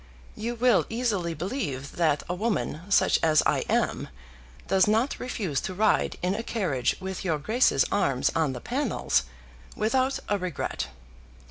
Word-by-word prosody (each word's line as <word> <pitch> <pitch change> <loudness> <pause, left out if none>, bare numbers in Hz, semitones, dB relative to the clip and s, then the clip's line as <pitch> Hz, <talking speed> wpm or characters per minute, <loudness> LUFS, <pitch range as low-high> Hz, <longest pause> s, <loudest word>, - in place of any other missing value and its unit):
You 235 +3 -3
will 240 -2 +3
easily 210 -8 -1
believe 150 - -4
that 155 -4 +2
a 180 - -2
woman, 200 -5 -1
such 200 - +4
as 155 -1 +4
I - - +3
am, - - 0 0.6
does 190 0 +4
not 225 +6 +1
refuse 195 - -2
to 185 - -5
ride 215 +2 +2
in 180 +1 +1
a 220 - -2
carriage 175 - -1
with 190 0 -5
your 165 -5 0
Grace's 215 - +2
arms 140 -10 +1
on 155 -5 +1
the 125 - -7
panels 250 - 0 0.5
without 260 +5 +1
a 205 -1 0
regret. 175 - -3
190 Hz, 150 wpm, -27 LUFS, 155-230 Hz, 0.6 s, such